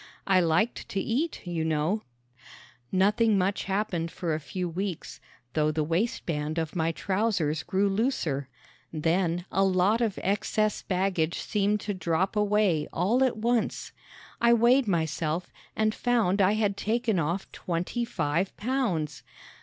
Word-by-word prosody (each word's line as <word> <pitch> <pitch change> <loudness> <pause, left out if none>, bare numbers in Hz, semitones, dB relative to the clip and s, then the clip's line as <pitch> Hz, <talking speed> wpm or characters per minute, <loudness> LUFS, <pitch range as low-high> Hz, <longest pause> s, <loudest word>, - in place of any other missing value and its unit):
I 190 -1 +4
liked 175 +7 +1
to 195 - -2
eat, 265 - -2
you 170 -2 -2
know. 160 +6 0 0.9
Nothing 205 +3 +3
much 195 +1 0
happened 195 -4 -1
for 165 -1 -3
a 155 - -1
few 180 +5 -4
weeks, 180 +1 -4 0.3
though 155 -1 +2
the 155 0 0
waistband 165 -3 -1
of 160 0 -2
my 165 -1 +1
trousers 185 -4 0
grew 195 +2 +1
looser. 195 - -1 0.4
Then 170 +2 0
a 195 - +2
lot 195 +4 +3
of 220 -4 0
excess 210 +2 0
baggage 180 -3 0
seemed 210 -1 0
to 205 - -3
drop 185 +1 0
away 210 -7 +2
all 225 +9 +2
at 255 -4 +1
once. 235 +1 0 0.5
I 235 0 +6
weighed 240 +2 +4
myself 165 -1 -1 0.2
and 215 0 +1
found 220 -6 +1
I 195 +2 +4
had 205 -2 0
taken 225 -3 0
off 170 +5 -2
twenty 180 +7 -2
five 170 -4 -1
pounds. 210 - -1
190 Hz, 140 wpm, -27 LUFS, 165-215 Hz, 0.9 s, I